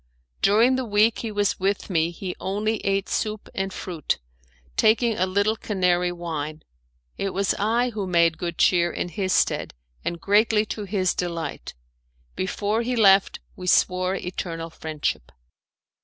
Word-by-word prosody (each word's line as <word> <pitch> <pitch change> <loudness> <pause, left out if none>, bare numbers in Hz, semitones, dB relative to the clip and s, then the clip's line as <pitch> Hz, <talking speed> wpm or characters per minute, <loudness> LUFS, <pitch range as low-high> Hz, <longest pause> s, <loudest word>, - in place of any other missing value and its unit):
During 230 +6 +4
the 260 - -1
week 215 0 +3
he 225 - -4
was 205 -1 0
with 195 +1 0
me 165 -3 +1
he 180 +1 -6
only 210 +3 -1
ate 195 -1 -1
soup 215 -1 -2
and 195 0 -2
fruit, 170 -5 -3 0.6
taking 225 +1 +3
a 185 0 +1
little 200 +3 +1
Canary 180 -4 +1
wine. 155 -3 -5 0.6
It 195 -2 -2
was 195 0 +1
I 235 +4 +1
who 205 -4 -4
made 170 -2 +3
good 170 -2 -4
cheer 175 -1 +3
in - - -3
his 185 +2 -2
stead - - +1 0.3
and 170 0 -3
greatly 210 +3 +3
to 210 0 -5
his 190 -2 0
delight. 170 -4 -4 0.6
Before 205 +4 -1
he 250 +1 -1
left 195 -3 +4
we 180 - -8
swore 185 +1 +3
eternal 165 -3 -5
friendship. 155 - -4
195 Hz, 150 wpm, -24 LUFS, 175-210 Hz, 0.6 s, During